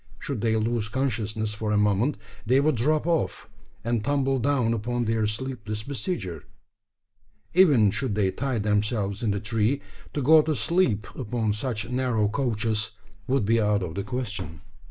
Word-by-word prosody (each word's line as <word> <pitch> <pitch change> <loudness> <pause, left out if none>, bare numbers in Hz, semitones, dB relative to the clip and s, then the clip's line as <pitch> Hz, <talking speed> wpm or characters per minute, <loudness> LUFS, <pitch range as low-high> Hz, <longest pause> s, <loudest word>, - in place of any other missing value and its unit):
Should 130 0 -4
they 110 -1 +2
lose 110 -1 0
consciousness 110 -4 -1
for 105 0 -3
a 105 - +3
moment, 105 +7 +2 0.3
they 125 +5 +3
would 155 +2 +3
drop 150 +6 +1
off, 170 -2 -1 0.4
and 115 -1 0
tumble 135 0 +1
down 125 -3 +2
upon 120 +2 -1
their 110 -1 +1
sleepless 110 -2 -4
besieger! 125 - -4 1.1
Even 145 - +6
should 105 0 -1
they 100 -3 +2
tie 130 +5 -2
themselves 105 -1 0
in 115 - 0
the 100 0 0
tree, 115 +5 0 0.4
to 145 - 0
go 155 +4 +7
to 155 0 -1
sleep 155 - +1
upon 115 -3 -1
such 110 0 -3
narrow 125 -4 +1
couches 110 -2 -1 0.3
would 130 -4 +1
be 115 +2 +3
out 105 -2 +2
of 85 -3 -4
the 100 - -2
question. 105 - -4
115 Hz, 160 wpm, -26 LUFS, 105-130 Hz, 1.1 s, go